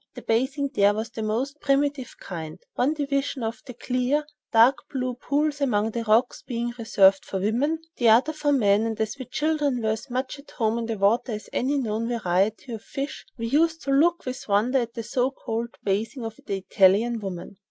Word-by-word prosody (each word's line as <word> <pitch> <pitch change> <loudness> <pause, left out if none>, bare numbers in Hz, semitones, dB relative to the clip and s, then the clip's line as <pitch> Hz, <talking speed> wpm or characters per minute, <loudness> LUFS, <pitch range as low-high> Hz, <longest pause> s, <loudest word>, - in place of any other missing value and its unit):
The - - -9
bathing 270 +5 0
here 205 -4 +4
was 220 +1 -3
of - - -39
the 220 - -5
most 250 +7 -2
primitive 280 -2 0
kind, 160 -2 -7 0.2
one 280 +5 +1
division 275 -3 -1
of 225 +1 -3
the 250 - -8
clear, 255 +4 0 0.3
dark 235 +4 +6
blue 255 -2 -2
pools 290 +4 -1
among 220 -5 +1
the 235 +1 -3
rocks 225 +3 +2
being 240 0 -3
reserved 195 -4 +4
for 190 - -4
women, 245 +11 +1 0.2
the 235 -2 +4
other 250 +8 +5
for 295 -1 0
men, 210 -7 +4
and 225 -1 -4
as 220 +5 -2
we 260 - -5
children 300 -2 0
were 220 -2 0
as 220 +5 -5
much 260 +3 -3
at 280 - -15
home 225 -1 0
in 230 - -3
the 225 -1 -2
water 220 +5 +2
as 215 - -7
any 275 +3 +1
known 230 -3 -1
variety 215 +1 0
of 220 - -6
fish, 275 +3 -6
we 230 - -3
used 320 +6 +2
to 275 - -2
look 335 +5 +3
with 255 0 -5
wonder 220 +6 +2
at 235 -1 -4
the 230 - -4
so 250 +3 0
called 235 -3 -5
bathing 220 +5 -1
of 225 -1 -5
the 195 - -1
Italian 200 +5 +3
women. 190 -1 -7
240 Hz, 205 wpm, -25 LUFS, 220-275 Hz, 0.3 s, dark